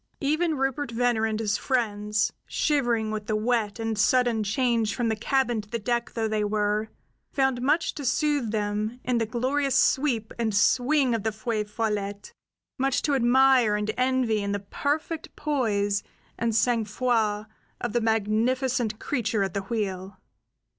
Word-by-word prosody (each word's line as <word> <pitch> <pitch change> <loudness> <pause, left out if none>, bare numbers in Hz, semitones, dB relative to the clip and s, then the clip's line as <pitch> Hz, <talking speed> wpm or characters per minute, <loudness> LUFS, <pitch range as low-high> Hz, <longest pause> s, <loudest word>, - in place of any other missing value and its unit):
Even 310 +2 +1
Rupert 270 +1 -1
Venner 235 -1 +1
and 220 -1 -2
his 215 -1 0
friends, 215 -4 0
shivering 240 -7 +1
with 215 -1 -4
the 215 - 0
wet 220 -1 0
and 225 -1 -2
sudden 240 -1 +3
change 230 0 +1
from 240 -2 0
the 220 - +1
cabin 240 0 0
to 205 - -19
the 235 - -2
deck 235 +2 -1
though 225 -1 0
they 215 -1 0
were, 210 +1 0 0.4
found 265 -3 +1
much 300 +6 +1
to 290 - -7
soothe 280 -1 +1
them 210 +2 -2
in 250 -2 +1
the 225 - 0
glorious 265 +4 0
sweep 250 -6 +1
and 220 -3 0
swing 255 +4 +3
of 225 - 0
the 220 - -1
Feu 220 -1 -2
Follette; 205 -2 -3 0.5
much 270 0 +1
to 295 - +1
admire 255 -3 +4
and 210 +1 -1
envy 250 -4 +1
in 200 0 -2
the 205 - -1
perfect 305 +3 -2
poise 205 -9 0 0.3
and 230 -1 -1
sang 230 0 +2
froid 215 -1 0 0.3
of 240 -3 -3
the 240 - +1
magnificent 225 +2 +1
creature 225 -6 -1
at 190 - -3
the 200 - -1
wheel. 195 -2 -4
230 Hz, 160 wpm, -26 LUFS, 215-255 Hz, 0.5 s, admire